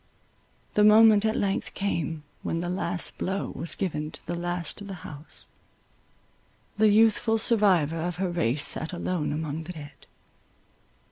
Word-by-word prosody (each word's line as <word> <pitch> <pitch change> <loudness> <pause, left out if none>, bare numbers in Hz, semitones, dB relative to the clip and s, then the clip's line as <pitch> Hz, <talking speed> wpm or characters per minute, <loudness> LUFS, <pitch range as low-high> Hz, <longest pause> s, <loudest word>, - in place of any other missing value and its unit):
The 210 - +4
moment 215 0 +7
at 220 - +1
length 195 -1 -1
came, 165 -6 -2 0.2
when 165 - -2
the 175 +1 -3
last 175 -1 -2
blow 195 +1 -2
was 165 +5 -3
given 155 -5 -2
to - - -13
the 175 - -3
last 175 +1 -3
of 205 - -8
the 195 - -6
house: 150 +1 -6 1.3
the 215 0 +4
youthful 225 +1 +4
survivor 190 -9 +3
of 170 +1 -2
her 180 0 -2
race 150 -5 +1
sat 160 +3 +1
alone 175 -2 -2
among 155 +1 -4
the 180 - -7
dead. 145 -3 -12
175 Hz, 150 wpm, -27 LUFS, 160-205 Hz, 1.3 s, moment